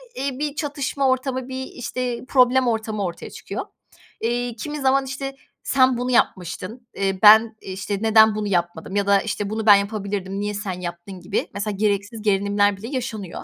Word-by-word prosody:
iii, 270 Hz, -1 st, -3 dB
bir 295 Hz, -1 st, -2 dB
çatışma 280 Hz, -2 st, -1 dB
ortamı, 260 Hz, 0 st, -1 dB
bir, 260 Hz, 0 st, -4 dB
işte, 250 Hz, -1 st, -4 dB
problem 255 Hz, -1 st, +4 dB
ortamı 220 Hz, -2 st, -1 dB
ortaya 175 Hz, -2 st, -5 dB
çıkıyor. -, -, -6 dB, 0.6 s
Eee, 240 Hz, +1 st, -1 dB
kimi 295 Hz, +6 st, -5 dB
zaman, 270 Hz, 0 st, +3 dB
işte, 270 Hz, +1 st, -5 dB, 0.3 s
"Sen 260 Hz, -2 st, +3 dB
bunu 250 Hz, +1 st, -2 dB
yapmıştın, 220 Hz, +3 st, -1 dB
eee, 195 Hz, -1 st, -1 dB
ben, 220 Hz, +1 st, +8 dB
işte, 195 Hz, +1 st, -4 dB
neden 220 Hz, -1 st, +5 dB
bunu 215 Hz, -1 st, -2 dB
yapmadım?" 175 Hz, -1 st, -2 dB
ya 200 Hz, -1 st, +1 dB
da, 200 Hz, -1 st, +4 dB
işte, 205 Hz, -2 st, -3 dB
"Bunu 220 Hz, 0 st, -3 dB
ben 205 Hz, -2 st, +9 dB
yapabilirdim, 200 Hz, -1 st, -2 dB
niye 205 Hz, 0 st, -2 dB
sen 190 Hz, -3 st, -4 dB
yaptın?" 175 Hz, +2 st, -7 dB
gibi, 175 Hz, -, -2 dB
mesela, 205 Hz, +1 st, -3 dB
gereksiz 205 Hz, +2 st, -1 dB
gerilimler 205 Hz, 0 st, +2 dB
bile 220 Hz, +4 st, -8 dB
yaşanıyor. 225 Hz, -8 st, -5 dB
220 Hz, 170 wpm, -22 LUFS, 200-255 Hz, 0.6 s, ben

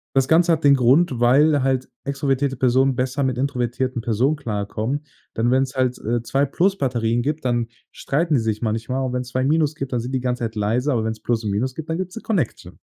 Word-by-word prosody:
Das 135 Hz, -1 st, +3 dB
Ganze 170 Hz, +2 st, +4 dB
hat 160 Hz, -1 st, +1 dB
den 140 Hz, -1 st, +6 dB
Grund, 130 Hz, +1 st, +3 dB
weil 140 Hz, +4 st, +4 dB
halt 130 Hz, -1 st, 0 dB
extrovertierte 140 Hz, -1 st, -1 dB
Personen 130 Hz, +1 st, +2 dB
besser 130 Hz, +3 st, -1 dB
mit 130 Hz, -2 st, -1 dB
introvertierten 125 Hz, -2 st, -2 dB
Personen 125 Hz, +6 st, +1 dB
klarkommen, 115 Hz, +3 st, -3 dB, 0.3 s
denn 115 Hz, +2 st, +1 dB
wenn's 130 Hz, 0 st, +1 dB
halt, 130 Hz, -1 st, 0 dB
äh, 115 Hz, +1 st, -2 dB
2 135 Hz, +5 st, +1 dB
Plus-Batterien 125 Hz, -, 0 dB
gibt, 150 Hz, 0 st, -2 dB
dann 120 Hz, -2 st, 0 dB, 0.2 s
streiten 155 Hz, +2 st, 0 dB
die -, -, +3 dB
sich 110 Hz, -1 st, -2 dB
manchmal 115 Hz, +4 st, -2 dB
und 125 Hz, -, -3 dB
wenn's 125 Hz, 0 st, -3 dB
2 130 Hz, +1 st, -1 dB
Minus 155 Hz, +1 st, +2 dB
gibt, 135 Hz, -4 st, -6 dB
dann 120 Hz, -, 0 dB
sind 125 Hz, +3 st, -5 dB
die 130 Hz, -, 0 dB
ganze 125 Hz, -1 st, -2 dB
Zeit 115 Hz, 0 st, -3 dB
leise, 115 Hz, +7 st, 0 dB
aber 115 Hz, -, 0 dB
wenn's 110 Hz, 0 st, -3 dB
Plus 115 Hz, -2 st, 0 dB
und 105 Hz, -, -2 dB
Minus 125 Hz, +6 st, -1 dB
gibt, 160 Hz, +2 st, -8 dB
dann 160 Hz, -, -1 dB
gibt's 185 Hz, 0 st, -5 dB
'ne 230 Hz, -, -6 dB
Connection. 185 Hz, -, -3 dB
130 Hz, 220 wpm, -22 LUFS, 120-140 Hz, 0.3 s, den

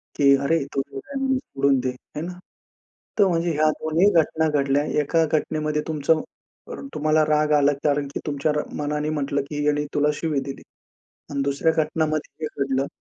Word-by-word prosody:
की 140 Hz, -1 st, +5 dB
अरे 165 Hz, +4 st, +2 dB
तो -, -, 0 dB
वेडा 140 Hz, -, -7 dB
आहे 275 Hz, -, -2 dB
म्हणून 265 Hz, -1 st, +2 dB
सोडून 140 Hz, -, +1 dB
दे 130 Hz, 0 st, -1 dB
आहे 125 Hz, +4 st, -8 dB
ना. 180 Hz, -, -5 dB, 0.9 s
तर 200 Hz, -, +6 dB
म्हणजे 170 Hz, -1 st, +1 dB
ह्या 155 Hz, +1 st, +3 dB
दोन्ही 160 Hz, +6 st, +3 dB
घटना 160 Hz, +1 st, 0 dB
घडल्या 140 Hz, +1 st, +2 dB, 0.2 s
एका 165 Hz, +3 st, +2 dB
घटनेमध्ये 150 Hz, 0 st, -1 dB
तुमचं 155 Hz, 0 st, +1 dB, 0.7 s
तुम्हाला 155 Hz, +1 st, +2 dB
राग 150 Hz, 0 st, +2 dB
आला 145 Hz, 0 st, +4 dB
कारण 145 Hz, -1 st, +1 dB
की -, -, -3 dB
तुमच्या 145 Hz, +1 st, 0 dB, 0.3 s
मनाने 150 Hz, +1 st, -1 dB
म्हटलं 145 Hz, -2 st, -1 dB
की 145 Hz, -1 st, -3 dB
ह्यानी 150 Hz, 0 st, +1 dB
तुला 145 Hz, 0 st, +2 dB
शिवी 150 Hz, -1 st, -1 dB
दिली 135 Hz, 0 st, -7 dB, 0.7 s
आणि 140 Hz, -1 st, -1 dB
दुसऱ्या 140 Hz, +4 st, +1 dB
घटनामध्ये 155 Hz, 0 st, -2 dB
हे 145 Hz, -2 st, -2 dB
घडलं. 135 Hz, 0 st, 0 dB
150 Hz, 170 wpm, -23 LUFS, 140-155 Hz, 0.9 s, तर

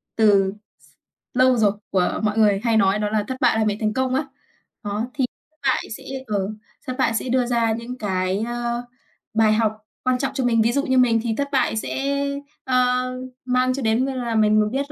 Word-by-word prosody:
từ 200 Hz, -3 st, +4 dB, 0.3 s
s -, -, -24 dB, 0.5 s
lâu 255 Hz, 0 st, +4 dB
rồi 210 Hz, -3 st, +4 dB, 0.2 s
của 185 Hz, -2 st, +1 dB
mọi 215 Hz, 0 st, 0 dB
người 205 Hz, -3 st, +4 dB
hay 230 Hz, -2 st, +3 dB
nói 195 Hz, 0 st, +3 dB
đó 210 Hz, 0 st, 0 dB
là 215 Hz, 0 st, 0 dB
thất 260 Hz, -, -3 dB
bại 240 Hz, -3 st, +3 dB
là 220 Hz, -, +2 dB
mẹ 210 Hz, -1 st, 0 dB
thành 215 Hz, -1 st, 0 dB
công 260 Hz, +1 st, 0 dB
á. 275 Hz, -, 0 dB, 0.6 s
Đó, 210 Hz, +3 st, -2 dB
thì 265 Hz, -, +1 dB, 0.4 s
bại 265 Hz, -2 st, +2 dB
sẽ 270 Hz, -, -14 dB, 0.2 s
ờ, 200 Hz, -2 st, -1 dB, 0.4 s
thất 255 Hz, -, -3 dB
bại 260 Hz, -4 st, +2 dB
sẽ 250 Hz, -, -2 dB
đưa 250 Hz, 0 st, +2 dB
ra 235 Hz, -2 st, +1 dB
những 235 Hz, +3 st, -6 dB
cái, 190 Hz, -3 st, -1 dB
ơ, 240 Hz, 0 st, -2 dB, 0.5 s
bài 220 Hz, -1 st, +4 dB
học 220 Hz, -1 st, +2 dB, 0.3 s
quan 255 Hz, 0 st, +2 dB
trọng 270 Hz, +1 st, -2 dB
cho 270 Hz, -1 st, -1 dB
mình. 230 Hz, -2 st, +3 dB
Ví 230 Hz, +2 st, +3 dB
dụ 280 Hz, +3 st, 0 dB
như 260 Hz, -1 st, +2 dB
mình 240 Hz, -3 st, +4 dB
thì 230 Hz, -2 st, 0 dB
thất 280 Hz, -, 0 dB
bại 260 Hz, -5 st, +1 dB
sẽ, 275 Hz, +5 st, -2 dB, 0.5 s
ơ, 250 Hz, -1 st, +2 dB, 0.4 s
mang 255 Hz, 0 st, +2 dB
cho 275 Hz, -, -4 dB
đến 225 Hz, +2 st, +2 dB
như 270 Hz, -, -2 dB
là 240 Hz, -3 st, -2 dB
mình 215 Hz, -1 st, +3 dB
biết 280 Hz, +3 st, -2 dB
235 Hz, 215 wpm, -22 LUFS, 215-255 Hz, 0.6 s, từ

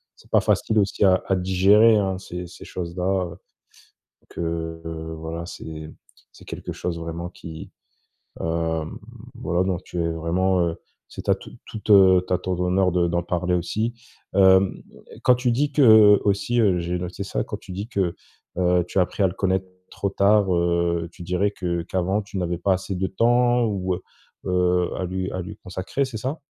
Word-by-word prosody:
c'est -, -, -22 dB
pas -, -, +5 dB
facile 110 Hz, -, +1 dB
aussi 100 Hz, 0 st, 0 dB
à 95 Hz, -1 st, +5 dB
à 95 Hz, -, +2 dB
digérer 95 Hz, +5 st, +5 dB
hein 95 Hz, -2 st, 0 dB
ces 90 Hz, -1 st, -7 dB
ces -, -, -12 dB
choses 85 Hz, -1 st, -6 dB
là, 90 Hz, -, -3 dB, 0.3 s
heu, 85 Hz, -, -14 dB, 0.9 s
que 80 Hz, -1 st, -4 dB, 0.4 s
voilà, 80 Hz, +1 st, -5 dB
c'est 80 Hz, -2 st, -8 dB, 0.4 s
c'est -, -, -16 dB
quelque -, -, -7 dB
chose 90 Hz, -1 st, -4 dB
vraiment 85 Hz, +1 st, -5 dB
qui, 80 Hz, -2 st, -10 dB, 0.7 s
hem, 80 Hz, -1 st, -2 dB, 0.4 s
voilà 90 Hz, +2 st, -1 dB
donc 95 Hz, -1 st, -2 dB
tu 90 Hz, -, -7 dB
es 85 Hz, -, 0 dB
vraiment, 90 Hz, +3 st, 0 dB
heu 80 Hz, -, -4 dB, 0.3 s
c'est -, -, -8 dB
ta -, -, +2 dB
toute -, -, -13 dB
toute, 105 Hz, 0 st, -7 dB
heu, 95 Hz, -2 st, +7 dB
à 90 Hz, -, +2 dB
ton 90 Hz, -1 st, -3 dB
honneur 90 Hz, +1 st, +2 dB
de 85 Hz, -1 st, +2 dB
d'en 85 Hz, 0 st, -1 dB
parler 90 Hz, 0 st, -1 dB
aussi, 110 Hz, +7 st, -1 dB, 0.4 s
hem, 95 Hz, -1 st, +5 dB, 0.4 s
quand 125 Hz, -, +6 dB
tu 125 Hz, 0 st, 0 dB
dis 140 Hz, +5 st, 0 dB
que 110 Hz, -7 st, +7 dB
aussi, 105 Hz, +4 st, +1 dB
heu, 95 Hz, -5 st, +3 dB
j'ai 85 Hz, +1 st, -2 dB
noté 90 Hz, +2 st, -5 dB
ça -, -, -2 dB
quand -, -, -5 dB
tu -, -, -11 dB
dis 100 Hz, +4 st, -5 dB
que, 95 Hz, -7 st, -1 dB, 0.4 s
heu, 90 Hz, -1 st, +2 dB
tu 90 Hz, -, -3 dB
as -, -, +6 dB
appris 95 Hz, +2 st, -1 dB
à -, -, +6 dB
le 90 Hz, -, -2 dB
connaître 95 Hz, -1 st, 0 dB, 0.2 s
trop 100 Hz, -, -2 dB
tard, 100 Hz, -1 st, +3 dB
heu, 85 Hz, -1 st, +1 dB
tu -, -, -11 dB
dirais 90 Hz, +3 st, 0 dB
que 85 Hz, -4 st, -3 dB
qu'avant 95 Hz, +4 st, -1 dB
tu 100 Hz, -1 st, -7 dB
n'avais 90 Hz, -1 st, -1 dB
pas 95 Hz, +3 st, +1 dB
assez 95 Hz, +1 st, -2 dB
de 95 Hz, +1 st, -1 dB
temps 120 Hz, +4 st, +3 dB
ou 95 Hz, -3 st, -1 dB
heu 90 Hz, -, -7 dB, 0.4 s
heu, 90 Hz, -1 st, +2 dB
à 95 Hz, -, -3 dB
lui 95 Hz, +1 st, -3 dB
à 90 Hz, -, -3 dB
lui 100 Hz, +4 st, -8 dB
consacrer, 95 Hz, +9 st, -3 dB
c'est 130 Hz, -4 st, -7 dB
ça? 130 Hz, +8 st, -4 dB
90 Hz, 190 wpm, -23 LUFS, 85-100 Hz, 0.9 s, heu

